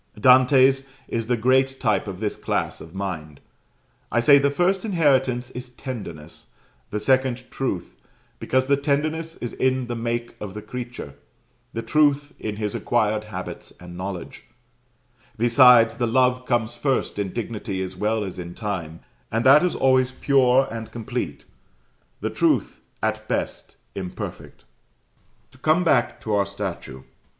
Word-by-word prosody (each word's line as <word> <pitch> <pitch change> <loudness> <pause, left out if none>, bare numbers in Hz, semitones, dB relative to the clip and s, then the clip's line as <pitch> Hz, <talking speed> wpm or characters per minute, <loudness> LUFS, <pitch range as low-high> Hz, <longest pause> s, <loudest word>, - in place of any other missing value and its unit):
Dante's 130 +2 +5 0.2
is 115 -1 -3
the 125 -1 +1
great 130 +3 +2
type 110 -3 +1
of 95 -2 -6
this 105 -1 -2
class - - -2
of 80 +3 -12
mind. 80 -7 -5 0.7
I 120 - +2
say 140 +4 +7
the 140 +1 +2
first 180 +6 +1
inheritance 135 - +1
is 125 0 -8
Tenderness 115 - -8 0.4
the 105 - -3
second 130 +2 +1
Truth, 110 -10 -3 0.4
because 130 0 +1
the 140 +1 +3
Tenderness 155 +3 -1
is 120 - -6
in 130 -1 +1
the 120 0 -4
make 120 0 -3
of 100 -2 -6
the 105 - -5
creature, 120 - -7 0.6
the 115 - -3
Truth 145 0 +2
in 105 -1 -4
his 105 -1 -3
acquired 110 -2 0
habits 105 - -7
and 90 0 -10
knowledge; 90 -1 -6 0.9
besides, 120 0 +6
the 120 - -1
love 125 +1 +2
comes 120 -2 0
first 130 -3 -1
in 100 -2 -2
dignity 105 -3 -4
as 95 0 -6
well 105 +3 0
as 95 -2 -6
in 85 0 -7
time, 85 -6 -4 0.3
and 115 +2 0
that 140 +5 +7
is 180 - +1
always 130 -1 +3
pure 135 -1 +3
and 115 -1 -6
complete: 120 - -4 0.8
the - - -2
truth, - - +1 0.2
at - - -1
best, - - -3 0.2
imperfect. 95 -2 -7 0.9
To 130 - -20
come 155 +6 +3
back 120 -7 +2
to 110 - -3
our 100 -1 +2
statue. 95 -9 -6
120 Hz, 150 wpm, -23 LUFS, 105-130 Hz, 0.9 s, say